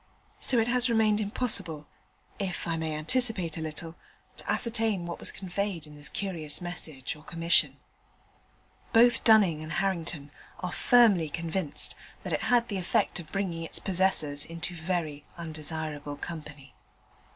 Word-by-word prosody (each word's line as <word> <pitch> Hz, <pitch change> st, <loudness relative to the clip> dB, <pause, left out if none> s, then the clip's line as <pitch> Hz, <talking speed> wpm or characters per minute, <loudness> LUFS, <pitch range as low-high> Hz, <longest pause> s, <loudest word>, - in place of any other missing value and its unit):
So 255 Hz, -, +3 dB
it 225 Hz, 0 st, +3 dB
has 250 Hz, 0 st, +2 dB
remained 220 Hz, -2 st, +3 dB
impossible 200 Hz, -8 st, 0 dB, 0.5 s
(if 190 Hz, -4 st, -3 dB
I 165 Hz, -, 0 dB
may 160 Hz, -1 st, -2 dB
anticipate 185 Hz, 0 st, +1 dB
a 160 Hz, -, -4 dB
little) 160 Hz, +1 st, -5 dB, 0.4 s
to -, -, -2 dB
ascertain 225 Hz, -6 st, 0 dB
what 170 Hz, -, -5 dB
was -, -, +2 dB
conveyed 190 Hz, -3 st, -3 dB
in 150 Hz, -, -12 dB
this 145 Hz, 0 st, -5 dB
curious 165 Hz, -7 st, -1 dB
message 165 Hz, -7 st, -5 dB
or 150 Hz, -, -14 dB
commission. 170 Hz, 0 st, +3 dB, 1.2 s
Both 240 Hz, +2 st, +6 dB
Dunning 200 Hz, -9 st, +5 dB
and 155 Hz, +1 st, -6 dB
Harrington 170 Hz, -6 st, -1 dB, 0.3 s
are 180 Hz, -1 st, -3 dB
firmly 210 Hz, -10 st, +5 dB
convinced 165 Hz, 0 st, -2 dB, 0.3 s
that -, -, -3 dB
it -, -, 0 dB
had 240 Hz, -1 st, +3 dB
the 200 Hz, -, -3 dB
effect 175 Hz, -, +1 dB
of 160 Hz, -3 st, -10 dB
bringing 190 Hz, -4 st, -2 dB
its 165 Hz, -, 0 dB
possessors 180 Hz, -6 st, +2 dB
into 170 Hz, +2 st, -5 dB
very 160 Hz, -3 st, -2 dB
undesirable 155 Hz, -2 st, -4 dB
company. 150 Hz, -4 st, -8 dB
170 Hz, 145 wpm, -29 LUFS, 155-200 Hz, 1.2 s, Both